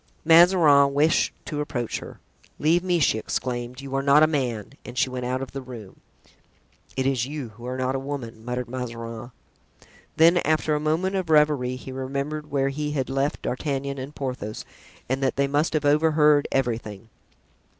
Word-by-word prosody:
Mazarin 160 -5 +6
wished 155 +3 +3
to 150 -2 -3
approach 120 -5 -3
her. - - -11 0.4
"Leave 165 +4 +2
me!" 180 -2 +1
she 140 -8 +2
exclaimed; 125 +2 -4
"you 135 -1 -8
are 135 - +1
not 140 +2 +5
a - - +8
man!" 130 -7 -2
and 125 0 -10
she 130 - +1
went 125 -1 -4
out 130 +1 -2
of 135 - -8
the 135 - -5
room. 120 -7 -10 1.0
"It 130 - 0
is 130 -2 +1
you 145 -4 -5
who 120 +3 -11
are 130 +1 -3
not 130 0 -1
a 135 - -1
woman," 130 -5 -6
muttered 125 +1 -3
Mazarin. 115 -2 -6 0.9
Then, 165 +2 +6
after 155 -1 +1
a 150 - +1
moment 165 +6 0
of 185 -4 -3
reverie, 150 -5 +3
he 130 +1 -9
remembered 140 +3 -4
where 135 -1 +1
he 150 +1 -3
had 135 -2 -2
left 135 +2 -1
D'Artagnan 140 +1 -3
and 135 +3 -7
Porthos 125 -6 -5 0.4
and 130 +2 -1
that 135 - +1
they 140 - +2
must 145 +4 0
have 155 -2 0
overheard 150 0 +4
everything. 115 -5 -2
135 Hz, 180 wpm, -24 LUFS, 125-150 Hz, 1.0 s, a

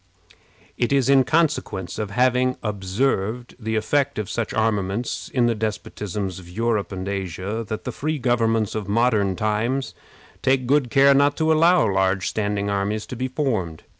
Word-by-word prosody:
It 120 - +1
is 135 -2 +2
in 135 -1 +6
consequence 120 - 0
of 105 -2 -2
having 125 +3 +2
observed 105 +3 -1
the 110 -1 -3
effect 140 +6 0
of 105 -1 -3
such 115 -2 -2
armaments 110 0 -1
in 125 -2 +2
the 120 - +2
despotisms 105 -3 -4
of 90 -2 -13
Europe 110 +2 -1
and 95 0 -5
Asia 100 +3 -3
that 110 - -4
the - - -4
free 155 +1 -2
governments 115 -4 +1
of 110 -2 -4
modern 105 -3 +2
times 110 +7 -1 0.5
take 130 -1 +2
good 135 -1 +2
care 140 +3 +6
not 140 +1 +3
to 160 0 +3
allow 170 0 +4
large 95 -1 +1
standing 105 -1 -1
armies 100 +2 -1
to - - -7
be 130 +2 -2
formed. 110 - -2
110 Hz, 165 wpm, -23 LUFS, 100-130 Hz, 0.5 s, in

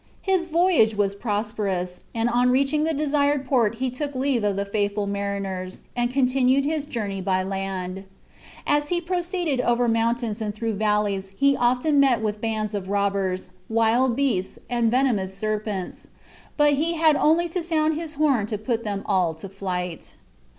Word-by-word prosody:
His 375 -3 +1
voyage 335 - +3
was 200 -1 +1
prosperous, 200 -4 -2
and 225 +1 +1
on 245 +1 +3
reaching 275 +4 +2
the 325 - +1
desired 285 -1 +1
port 235 -5 +2
he 255 +2 -2
took 285 +2 -4
leave 260 -3 0
of 205 -1 +1
the 200 +1 -1
faithful 205 0 -1
mariners, 200 -2 -4
and 240 0 +1
continued 260 +1 +2
his 300 -1 -1
journey 205 -7 -3
by 185 0 +1
land. 190 -1 -4 0.6
As 295 0 +2
he 345 +2 0
proceeded 345 -5 -1
over 240 0 +2
mountains 230 -1 0
and 210 -2 -3
through 225 0 -2
valleys 205 -2 0
he 280 0 +4
often 255 +5 +2
met 265 -5 +4
with 210 -1 -3
bands 220 -2 -2
of 195 -2 -4
robbers, 200 -2 -1 0.2
wild 230 +2 +2
beasts, 240 -9 0
and 235 -2 +2
venomous 220 -7 +1
serpents, 210 -2 -3 0.5
but 295 -1 +5
he 320 +4 +1
had 315 -2 +4
only 325 +4 +3
to 360 +2 -2
sound 315 -2 +1
his 315 0 -5
horn 275 -8 +2
to 210 - -3
put 230 +2 -2
them 200 -3 -3
all 180 -5 +1
to 160 +5 -8
flight. 180 -3 -5
230 Hz, 165 wpm, -24 LUFS, 200-280 Hz, 0.6 s, but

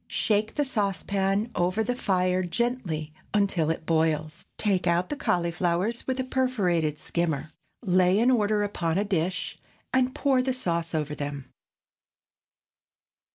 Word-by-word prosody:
Shake 215 0 0
the 290 - +1
saucepan 200 -1 0
over 180 +5 +1
the 245 +3 0
fire 185 -5 +1
gently 180 -6 -2 0.2
until 195 -6 +2
it 160 0 -2
boils; 155 -1 0
take 190 -4 +1
out 170 +1 +2
the - - -2
cauliflowers 180 - 0
with 260 0 -1
a - - +1
perforated 195 - 0
skimmer, 160 -2 -2 0.3
lay 185 -1 +4
in 240 +4 +4
order 210 -3 +2
upon 175 -5 -1
a 200 - +2
dish, 185 -2 -1 0.3
and 260 0 +2
pour 270 -3 +2
the 260 0 0
sauce 170 -8 -1
over 150 -1 -1
them. 145 -2 -5
185 Hz, 135 wpm, -27 LUFS, 165-220 Hz, 0.3 s, lay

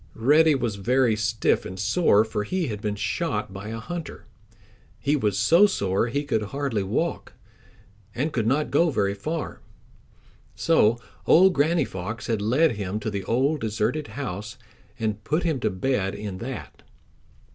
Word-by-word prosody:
Reddy 150 +6 +4
was 115 -6 -2
very 120 +2 +2
stiff 110 +1 +1
and 95 +1 -7
sore, 110 - +3
for 105 -1 -3
he 175 - -2
had 105 -2 -5
been 105 -2 -2
shot 100 - -2
by 100 +2 -7
a 115 +1 -5
hunter. 170 +7 -7 0.7
He 145 +1 +1
was 105 -8 0
so 165 - +5
sore 100 - 0
he 140 +5 -1
could 130 -7 0
hardly 130 0 -2
walk, 115 - -2 0.8
and 145 +5 -1
could 115 -3 0
not 145 +5 +1
go 165 +4 +4
very 100 -8 0
far. 155 +10 -5 0.9
So 115 - +3 0.3
old 185 +3 +6
Granny 160 +3 +2
Fox 105 +3 -6
had 110 -3 -1
led 135 +10 +3
him 100 +1 -3
to 110 0 -3
the 100 -1 -3
old 135 +8 +1
deserted 110 +8 -1
house 110 -5 -5 0.4
and 110 -3 -2
put 155 +8 0
him 160 -6 0
to 110 - 0
bed 100 0 -1
in 100 -2 -6
that. 115 - -7
115 Hz, 160 wpm, -25 LUFS, 105-145 Hz, 0.9 s, old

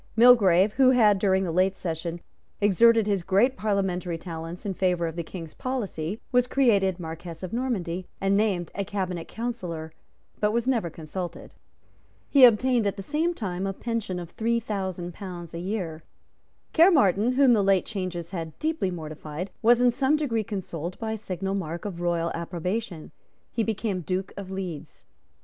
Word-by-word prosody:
Mulgrave, 215 -5 +6
who 265 +1 +5
had, 215 -6 +5
during 190 -1 +2
the 175 - -2
late 185 +3 +2
session, 170 0 -4 0.4
exerted 225 +3 +5
his 200 -3 +1
great 200 +9 +3
parliamentary 190 -6 -1
talents 165 +1 -7
in 200 - -1
favour 180 -2 +1
of 165 -1 -4
the 170 - -2
King's 165 -1 -8
policy, 210 -7 -3
was 250 -1 +3
created 200 -9 +2
Marquess 165 +1 -7
of 185 - -5
Normanby, 190 -8 -2
and 195 0 +2
named 200 -5 +1
a 200 - -2
Cabinet 185 -3 -3
Councillor, 180 -10 -5 0.5
but 210 0 +2
was 235 +2 0
never 230 -10 +1
consulted. 165 +3 -7 0.7
He 275 -3 +8
obtained 240 -1 +4
at 200 0 -2
the 195 - -5
same 320 - 0
time 190 - -3
a 195 - -2
pension 225 -4 -3
of 175 -1 -7
three 235 +1 0
thousand 190 -5 -4
pounds 175 -3 -8
a 170 - -4
year. 180 -4 -3 0.7
Caermarthen, 255 - +5
whom 265 -1 +5
the 210 -3 +3
late 195 -1 +3
changes 185 -4 -4
had 165 -4 -5
deeply 315 -11 -1
mortified, 155 +1 -6
was 240 +1 +5
in 250 -1 +5
some 270 +4 +2
degree 245 -8 0
consoled 185 -4 -5
by 225 -1 -3
a - - -1
signal 195 -1 -3
mark 170 -1 -4
of 180 -4 -5
royal 170 -1 0
approbation. 175 +1 -4 0.4
He 230 - -1
became 215 -3 -1
Duke 185 +3 -3
of 195 -2 -7
Leeds. 185 -6 -6
195 Hz, 170 wpm, -26 LUFS, 175-225 Hz, 0.7 s, He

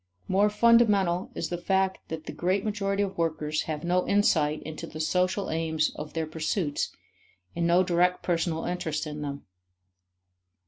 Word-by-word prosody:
More 200 +3 +3
fundamental 210 -5 +4
is - - -3
the 175 - -3
fact 190 +1 +1
that 160 -1 -5
the - - -5
great 185 +3 0
majority 200 -1 0
of 195 -2 -5
workers 155 -2 0
have 150 -1 -3
no 180 +1 +1
insight 155 -7 +2
into 155 0 -7
the 155 - -9
social 180 +4 0
aims 160 -1 0
of 150 0 -8
their 160 -1 -1
pursuits 155 0 -2 0.6
and 170 0 +1
no 175 +2 +5
direct 180 0 +2
personal 165 -2 0
interest 160 -4 -2
in 150 -1 -6
them. 140 -1 -5
175 Hz, 155 wpm, -27 LUFS, 155-190 Hz, 0.6 s, no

